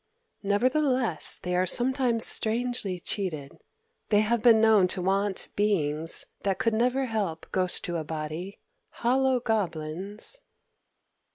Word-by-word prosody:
Nevertheless 250 - 0
they 180 0 -2
are 185 +1 +1
sometimes 245 0 +3
strangely 225 -4 +1
cheated. 165 -8 -5 0.5
They 210 -1 +4
have 225 +1 0
been 230 -1 +6
known 220 -4 +4
to 185 0 -3
want 195 +1 -1
beings 165 -6 +1 0.2
that 195 -2 -1
could 230 - 0
never 250 +4 +1
help 205 -9 -3
ghost 185 -1 0
to 175 -1 -3
a 160 - -4
body, 155 +5 -6 0.3
hollow 260 +1 +1
goblins...." 200 - -3
205 Hz, 120 wpm, -26 LUFS, 180-235 Hz, 0.5 s, been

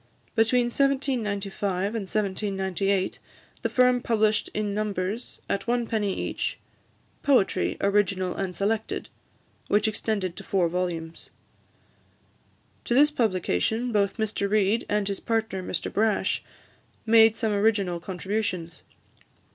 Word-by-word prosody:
Between 240 +2 +3
1795 210 -8 0
and 205 -5 -4
1798, 195 -1 -1 0.4
the - - 0
firm 250 -1 +4
published 215 -2 +1
in 210 -1 -2
numbers, 205 +1 -3
at 200 - -2
one 240 0 +1
penny 215 -4 0
each, - - -2 0.6
"Poetry, 225 -9 +2
Original 195 -2 +1
and 190 -2 -3
Selected," 215 +2 -1 0.6
which 210 +1 +3
extended 205 -4 -2
to - - -9
four 185 -3 +1
volumes. 170 -2 -3 1.6
To 240 - +1
this 295 +3 +6
publication, 220 - 0
both 200 -1 +1
Mr 215 -2 -1
Reid, 210 +2 +2
and 205 -1 +1
his 200 -1 -2
partner, 225 -4 -1
Mr 180 - -3
Brash, 215 +1 +1 0.6
made 225 0 +6
some 220 -3 0
original 200 -4 +1
contributions. 185 -2 -3
205 Hz, 115 wpm, -26 LUFS, 190-225 Hz, 1.6 s, this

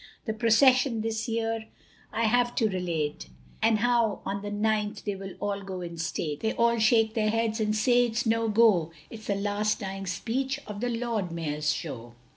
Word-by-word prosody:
The 220 - -1
procession 240 +1 +4
this 220 0 -2
year 225 -1 -2 0.4
I 230 - -1
have 240 +2 +2
to 225 - +3
relate, 170 -6 -2 0.3
And 220 0 +4
how 235 -1 +1
on 200 +1 -3
the 205 - -5
ninth 210 0 -1
they 205 - -1
will 195 -1 -8
all 200 -1 -2
go 190 -2 -6
in 170 -1 -7
state. 155 -2 -2
They 220 - -1
all 235 0 +2
shake 220 0 +4
their 215 -2 +1
heads 225 0 0
and 215 0 +1
say 245 +2 +4
it's 235 +2 -2
no 225 0 +1
go, 210 -7 +4 0.2
It's 220 -1 -10
the 200 - +1
last 205 +1 0
dying 195 -2 -5
speech 260 +9 -2
of 210 -1 -7
the 245 - 0
Lord 230 -6 -2
Mayor's 150 -3 -1
Show. 120 -2 -6
215 Hz, 190 wpm, -27 LUFS, 195-230 Hz, 0.4 s, procession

